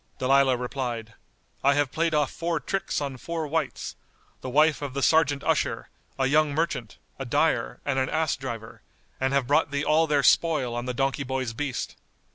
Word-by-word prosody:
Dalilah 135 0 +3
replied, 120 -3 -4 0.5
"I 140 +1 +4
have 145 -3 +1
played 165 -1 0
off 150 -2 +1
four 170 -1 -2
tricks 195 -1 -2
on 140 -2 -4
four 165 +4 -4
wights; 155 -1 -3 0.5
the 130 - -5
wife 150 +4 +3
of 140 -2 -5
the 140 - -1
Serjeant 155 -3 +3
usher, - - 0 0.3
a 135 - +1
young 150 +1 +3
merchant, 145 -9 -2 0.2
a - - -4
dyer - - 0
and 135 -2 0
an 130 - 0
ass 160 -2 +1
driver, 115 -4 -7 0.4
and 130 0 +1
have 140 -2 +2
brought 145 +4 +2
thee 140 +1 -2
all 160 +1 +3
their 145 -2 +2
spoil 150 -8 +3
on 120 +1 -3
the 125 - -2
donkey 135 +2 0
boy's 130 -3 -2
beast." 130 0 -4
140 Hz, 185 wpm, -26 LUFS, 130-155 Hz, 0.5 s, I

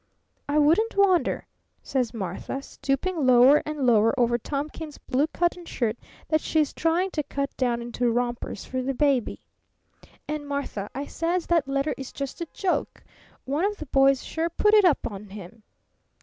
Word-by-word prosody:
'I 290 - +1
wouldn't 340 +10 +3
wonder,' 380 -3 +3 0.4
says 255 -4 -1
Martha, 225 +5 -5
stooping 295 +6 -2
lower 255 +3 +7
and 300 -3 -2
lower 225 +2 +4
over 240 0 +2
Thomkins's 295 +4 -5
blue 275 +4 0
cotton 345 +2 -1
shirt 235 -9 -2 0.3
that 310 0 +2
she's 310 -3 +1
trying 345 +4 +1
to 305 - -1
cut 280 -1 -4
down 240 -2 0
into 240 0 -1
rompers 240 -3 -2
for 255 0 -3
the 265 +1 -2
baby. 275 -4 +1 0.8
'And, 300 -1 -4
Martha,' 280 -8 -4
I 280 +2 -3
says, 335 +3 -1
'that 335 -5 +2
letter 275 +2 0
is 270 - -7
just 275 +3 -6
a 340 - -3
joke. 375 -3 -2 0.4
One 285 +6 -1
of 410 +1 0
the 310 - -7
boys 270 -1 +3
sure 325 +1 -2
put 420 +5 +2
it 420 -2 +7
up 335 -6 +3
on 205 -1 -7
him!' 200 +2 -11
280 Hz, 165 wpm, -25 LUFS, 245-325 Hz, 0.8 s, lower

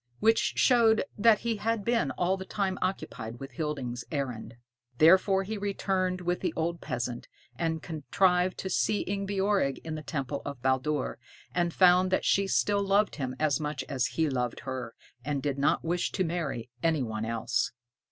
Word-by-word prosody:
Which 225 +1 +3
showed 230 -3 +4
that 215 0 +4
he 230 -2 -1
had 220 -1 -1
been 235 -1 +2
all 180 +2 0
the 190 - -6
time 190 -1 -2
occupied 120 -11 -3
with 135 0 -8
Hilding's 130 -4 -3
errand. 125 -6 -4 0.4
Therefore 190 +5 +5
he 210 +2 -4
returned 190 -2 -1
with 175 0 -1
the 180 -4 -2
old 170 +1 -2
peasant, 120 -3 -4 0.3
and 160 -2 -2
contrived 180 +3 +1
to 190 - -4
see 210 - +1
Ingebjorg 195 -6 0
in 160 - -5
the 155 - -4
temple 140 -2 -3
of 140 -3 -6
Baldur, 130 +2 0 0.3
and 175 -1 +1
found 180 +1 +5
that 190 - +1
she 195 0 +3
still 200 +1 +2
loved 200 +1 +2
him 130 -3 -3
as 150 -3 +2
much 150 -3 -3
as 130 -3 0
he 160 -1 +3
loved 125 -4 -2
her, 130 -3 -5 0.3
and 145 +1 -1
did 140 -2 -1
not 140 - +2
wish 175 +1 0
to 190 - +1
marry 155 -9 -3
any 160 -4 +2
one 110 -2 -3
else. 115 +1 -1
165 Hz, 170 wpm, -29 LUFS, 135-195 Hz, 0.4 s, Therefore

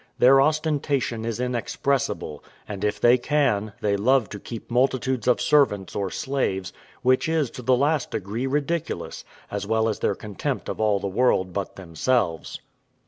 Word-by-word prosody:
Their 135 +2 +6
ostentation 145 -6 0
is 115 0 -3
inexpressible; 125 - -2 0.2
and, 100 -1 -6
if 105 0 0
they 120 +3 +5
can, 110 -7 +1
they 100 -1 +1
love 120 +3 +2
to 105 - -7
keep 115 +3 -8
multitudes 130 -1 +1
of 125 - +4
servants 105 - +2
or 100 -2 -1
slaves, 130 -9 -2 0.3
which 130 +4 +3
is 155 -6 +1
to - - -8
the 125 +1 +3
last 145 +1 +1
degree 110 +6 -3
ridiculous, 150 +4 -2 0.3
as 100 0 -3
well 110 0 +2
as 110 - -2
their 100 - 0
contempt 105 -1 -4
of - - -4
all 105 -2 +3
the 100 - -5
world 95 -3 +1
but 100 0 -4
themselves. 90 +1 -1
120 Hz, 160 wpm, -24 LUFS, 100-135 Hz, 0.3 s, Their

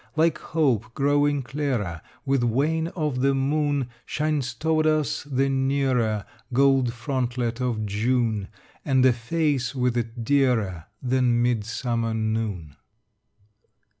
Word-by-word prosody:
Like 160 +1 +2
hope 120 -9 0
growing 145 0 +2
clearer 125 - -2 0.2
With 135 -2 +2
wane 150 +8 +1
of 150 -7 -1
the 135 0 +3
moon, 140 -1 0
Shines 150 -4 -1
toward 155 0 +1
us 155 -1 +1
the 135 -1 +1
nearer 130 -6 +1 0.3
Gold 135 -1 +3
frontlet 120 -1 -2
of 115 -4 -1
June, 110 0 0 0.4
And 130 -3 +3
a 130 - +6
face 140 +2 -1
with 125 -2 +1
it 115 0 -3
dearer 115 - +1 0.2
Than 125 -2 +2
midsummer 115 0 -1
noon. 110 -9 -2
125 Hz, 115 wpm, -25 LUFS, 115-140 Hz, 0.4 s, a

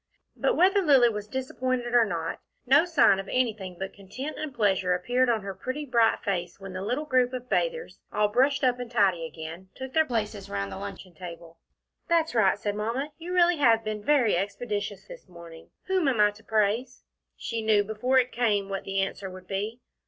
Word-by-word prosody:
But - - +1
whether 385 +3 +4
Lilly 275 -8 +5
was 210 -2 -5
disappointed 255 0 -2
or 240 -2 +6
not, 165 -5 -3 0.3
no 285 +6 +5
sign 320 - +4
of 195 - -6
anything 215 -7 -1
but 195 +1 -5
content 255 +10 -7
and 310 -2 -4
pleasure 195 -6 +1
appeared 245 +8 +1
on 225 -4 +1
her 195 -1 -5
pretty, 260 +10 -5
bright 235 -4 +2
face 180 -3 -3
when 195 -1 -8
the 185 - -5
little 250 +9 -2
group 255 -3 +2
of 250 -1 -5
bathers, 485 - -1
all 210 - +2
brushed 270 +7 +2
up 250 -1 +2
and 245 -1 -5
tidy 190 -8 +2
again, 165 +4 -9
took 265 0 -7
their 315 -1 +3
places 210 -4 -3
round 100 0 -3
the 95 - -6
luncheon 175 - -8
table. 170 0 -10 0.5
"That's 330 -3 +2
right," 205 -5 +3
said 205 0 -2
Mamma. 230 +8 -3
"You 340 +2 -7
really 350 -1 +4
have 230 -6 +4
been 215 -1 -4
very 260 -8 +3
expeditious 205 0 -3
this - - -12
morning. 170 -2 -13
Whom 375 -5 +1
am 250 -5 +1
I 210 0 +5
to 210 +2 -18
praise?" 220 +4 0 0.3
She 230 -1 -3
knew 215 -2 +3
before 220 +5 0
it 250 -1 +3
came 210 -5 0
what 195 -1 -4
the 195 0 0
answer 195 0 -3
would 185 0 -11
be. 210 +5 -4
220 Hz, 200 wpm, -27 LUFS, 195-255 Hz, 0.5 s, or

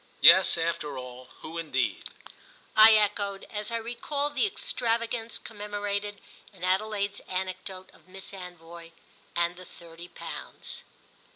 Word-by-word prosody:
"Yes, - - +9
after 165 -4 -1
all, 125 0 -8
who 165 +1 -6
indeed?" 165 -2 -1 0.7
I 220 +1 +10
echoed 205 -2 +1
as 210 0 -3
I - - 0
recalled 280 +6 -1
the 420 - +2
extravagance 230 - -1
commemorated 205 -1 -4 0.3
in 185 -4 -14
Adelaide's 200 +2 0
anecdote 185 0 -5
of - - -22
Miss 190 +1 -7
Anvoy 170 -2 -10 0.4
and 170 +1 +1
the 185 - -10
thirty 170 0 -12
pounds. - - -7
195 Hz, 120 wpm, -28 LUFS, 170-215 Hz, 0.7 s, I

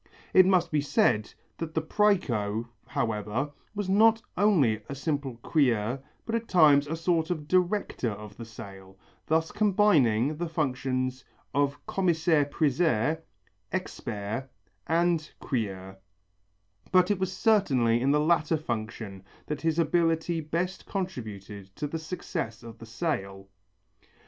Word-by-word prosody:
It 185 -1 +7
must 185 -2 +3
be 150 -2 +2
said 140 - +2 0.3
that 160 -1 -5
the 160 - +2
præco, 120 - +1 0.2
however, 110 +5 -2 0.2
was 205 -2 -2
not 220 +4 +5 0.2
only 155 - +3
a 140 - -4
simple 140 -3 -2
crieur 125 -5 +1 0.3
but 225 - -4
at 230 0 -1
times 150 -5 +5
a 160 - -2
sort 165 -1 0
of 155 -4 -3
director 185 - +1
of 105 0 -8
the 115 - -8
sale, 95 -4 -11 0.3
thus 160 +1 +1
combining 155 - +3
the 175 0 -3
functions 130 -4 -1 0.3
of 140 0 0
commissaire 165 -5 +2
priseur, 150 -1 +1 0.5
expert 120 - -4 0.4
and 165 -1 +1
crieur, 95 -6 -3 0.9
but 185 +1 +5
it 200 - 0
was 190 -1 -1
certainly 135 - +3
in 135 - +2
the 150 +1 +4
latter 155 0 +2
function 110 -7 -5 0.2
that 150 -1 -4
his 160 0 0
ability 165 0 +1
best 170 +5 -3
contributed 105 - -6
to 150 - -3
the 160 +3 -3
success 160 - -5
of 115 -1 -11
the 115 - -10
sale. 100 - -3
150 Hz, 130 wpm, -28 LUFS, 115-175 Hz, 0.9 s, It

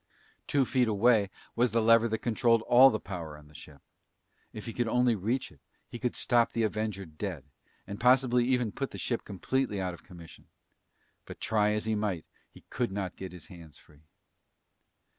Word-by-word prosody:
Two 140 -2 +2
feet 125 -1 +1
away 110 -1 +3 0.3
was 120 0 +1
the 115 - +3
lever 115 +1 +5
that 110 -1 -3
controlled 115 -1 +2
all 125 +3 +7
the 110 -4 -2
power 85 -6 -7
on 75 0 -17
the 75 - -20
ship. 75 -2 -13 0.7
If 105 - -9
he 115 - -6
could 120 -1 -1
only 125 +1 +2
reach 115 +7 -2
it, 75 - -20 0.3
he 120 - -8
could 125 -1 -2
stop 120 -1 +2
the 115 - 0
Avenger 110 -2 -2
dead, 80 -1 -6 0.4
and 100 - -7
possibly 125 -1 +4
even 125 -3 +1
put 135 +5 -4
the - - -9
ship 120 - -2
completely 105 +2 -2
out 90 -1 -2
of 85 - -12
commission. 85 -3 -14 0.8
But - - -10
try 105 -1 +1
as 105 0 -2
he 110 - 0
might, 105 -6 -2 0.2
he - - -17
could 120 -4 -1
not 95 -2 -4
get 95 -1 -8
his 90 -3 -11
hands 85 -6 -13
free. 75 +1 -22
110 Hz, 190 wpm, -29 LUFS, 95-120 Hz, 0.8 s, all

